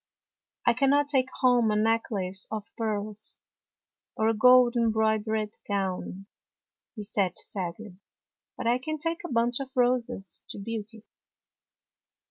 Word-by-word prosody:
" - - -53
I 240 - +5
cannot 280 +3 +3
take 260 -3 +2
home 245 -3 +4
a 210 - +1
necklace 210 -4 0
of 215 -2 -4
pearls, 215 -1 -3 0.8
or 220 0 +2
a - - +3
gold 250 +2 +6
embroidered 220 -1 +1
gown," 195 -1 -2 0.7
he 215 - -6
said 200 -3 -1
sadly, 185 +1 -6 0.3
" - - -65
but 255 - -5
I 240 +2 +3
can 310 +4 -3
take 330 +3 -3
a 350 - -6
bunch 235 +1 +1
of 270 -1 -5
roses 245 -6 0
to - - -7
Beauty." 220 +1 -5
220 Hz, 135 wpm, -28 LUFS, 205-250 Hz, 0.8 s, gold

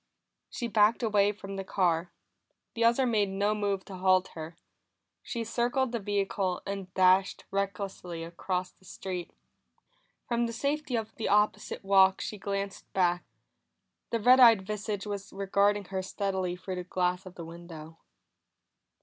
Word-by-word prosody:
She 240 - -4
backed 220 +2 +3
away 205 -2 +3
from 195 -1 -8
the 195 - -3
car; 175 -3 0 0.6
the 230 - -1
other 235 +3 +4
made 215 -5 +2
no 200 +2 +1
move 200 -2 -1
to 195 - -8
halt 185 0 +3
her. 160 +1 -8 0.6
She 235 -2 -4
circled 240 +3 0
the 235 - -2
vehicle 195 -2 -1
and 195 -2 -5
dashed 185 +1 +3
recklessly 195 -3 -3
across 180 +2 -3
the - - -30
street. 180 -1 -6 1.0
From 235 0 +1
the 230 - -5
safety 285 +2 -1
of 225 -1 -3
the 225 - -2
opposite 210 0 +1
walk 190 -1 +5
she 210 - -5
glanced 200 0 -4
back; 175 -2 +2 0.9
the 230 - 0
red 250 +4 +6
eyed 225 -6 +7
visage 210 0 -3
was 200 -1 -5
regarding 200 +1 +1
her 190 - 0
steadily 190 -2 -2
through 185 0 -6
the 180 - -3
glass 180 +1 -1
of 180 - -11
the 170 - -7
window. 165 -1 -10
195 Hz, 150 wpm, -29 LUFS, 185-215 Hz, 1.0 s, eyed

